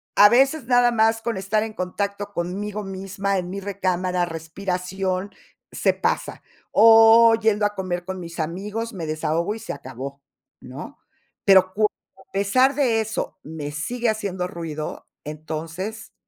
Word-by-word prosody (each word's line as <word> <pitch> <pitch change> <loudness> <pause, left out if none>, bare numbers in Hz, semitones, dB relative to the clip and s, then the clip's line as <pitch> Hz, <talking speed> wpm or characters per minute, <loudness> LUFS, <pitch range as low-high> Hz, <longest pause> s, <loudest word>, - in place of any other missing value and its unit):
A 205 - +8
veces 270 +4 +3
nada 245 0 +4
más 225 0 +2
con 230 -4 -2
estar 205 +3 0
en 220 -1 -6
contacto 200 +2 -3
conmigo 200 +4 -3
misma, 195 +1 -3
en 180 0 -5
mi 200 +1 -4
recámara, 185 -2 -1
respiración, 185 +3 -3 0.4
se - - +1
pasa. - - -2 0.3
O, 225 +1 +8
yendo 220 -2 +1
a 205 - 0
comer 180 -2 -3
con 190 0 -5
mis 170 0 -8
amigos, 205 +8 -3
me 175 -5 -5
desahogo 160 +5 -1
y 225 - -8
se 225 - -5
acabó, 135 +2 -8 0.4
¿no? 135 - -9 0.5
Pero 190 -1 +6
cuando 215 0 +2 0.4
a - - -44
pesar 255 +8 +3
de 245 -6 +2
eso, 220 -3 -4
me 150 -2 -6
sigue 235 +11 -2
haciendo 195 -4 -2
ruido, 160 -3 -6 0.2
entonces 160 +8 -6
195 Hz, 145 wpm, -23 LUFS, 175-220 Hz, 0.5 s, A